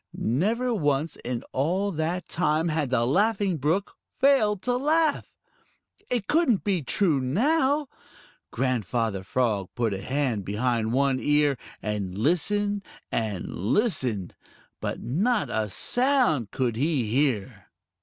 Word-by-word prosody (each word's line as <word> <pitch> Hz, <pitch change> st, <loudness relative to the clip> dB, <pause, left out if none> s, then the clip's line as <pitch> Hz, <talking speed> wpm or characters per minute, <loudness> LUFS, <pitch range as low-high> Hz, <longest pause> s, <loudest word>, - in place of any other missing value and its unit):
Never 220 Hz, -, 0 dB
once 150 Hz, -5 st, 0 dB
in 120 Hz, -1 st, -4 dB
all 180 Hz, +9 st, 0 dB
that 170 Hz, +2 st, -2 dB
time 160 Hz, 0 st, +1 dB
had 155 Hz, -4 st, -1 dB
the 120 Hz, -2 st, +2 dB
Laughing 195 Hz, -, +1 dB
Brook 160 Hz, +8 st, -1 dB, 0.2 s
failed 215 Hz, -8 st, +3 dB
to 245 Hz, 0 st, +1 dB
laugh. 305 Hz, +3 st, +1 dB, 0.8 s
It 240 Hz, -5 st, -1 dB
couldn't 300 Hz, -, +2 dB
be 190 Hz, -5 st, 0 dB
true 160 Hz, 0 st, +1 dB
now! 275 Hz, -, +1 dB, 0.6 s
Grandfather 115 Hz, -5 st, -1 dB
Frog 105 Hz, -2 st, -1 dB
put 115 Hz, -4 st, 0 dB
a 95 Hz, -, -4 dB
hand 130 Hz, -3 st, -1 dB
behind 110 Hz, +2 st, 0 dB
one 135 Hz, +1 st, +2 dB
ear 145 Hz, 0 st, +3 dB, 0.3 s
and 100 Hz, -3 st, -3 dB
listened 205 Hz, -, +1 dB, 0.3 s
and 105 Hz, -5 st, -2 dB
listened, 115 Hz, -, 0 dB, 0.5 s
but -, -, -3 dB
not 200 Hz, -, 0 dB
a 110 Hz, -1 st, -1 dB
sound 245 Hz, -, +1 dB
could 120 Hz, -4 st, -1 dB
he 140 Hz, -2 st, +1 dB
hear. 120 Hz, -4 st, -1 dB
150 Hz, 125 wpm, -26 LUFS, -, 0.8 s, failed